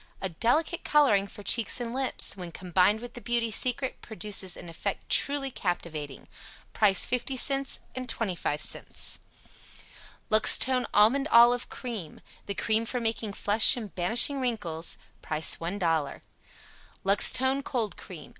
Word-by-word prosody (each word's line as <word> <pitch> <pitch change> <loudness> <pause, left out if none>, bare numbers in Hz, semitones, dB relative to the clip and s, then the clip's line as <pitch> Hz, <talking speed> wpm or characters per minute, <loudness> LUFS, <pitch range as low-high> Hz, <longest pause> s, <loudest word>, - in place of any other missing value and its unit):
A 190 - -3
delicate 275 - 0
coloring 235 -10 +3
for 205 - -11
cheeks 230 +3 +4
and 235 -1 -4
lips; 265 -5 -2
when 180 -3 -8
combined 185 +5 +1
with 245 0 -9
the 240 - -10
"Beauty 235 -1 -1
Secret," 255 +4 -1
produces 210 -4 -1
an - - -10
effect 165 - -5
truly 280 -1 +2
captivating. 160 - -5 0.5
Price 200 -3 +4
50c, 270 +2 0 0.2
25c. 200 - -1 1.1
LUXTONE 250 +3 +3
ALMONDOLIVE 240 +1 +4
CREAM. 220 - -7 0.3
The 200 - -4
cream 220 +2 0
for 250 - -2
making 225 -2 -2
flesh 210 +4 +3
and 215 -5 -7
banishing 235 +10 +2
wrinkles. 175 -10 -2 0.2
Price 155 0 +1
$1.00. 165 -5 -2 0.8
LUXTONE 260 +7 +3
COLD 235 -7 -3
CREAM. 160 -6 -11
220 Hz, 120 wpm, -27 LUFS, 185-250 Hz, 1.1 s, cheeks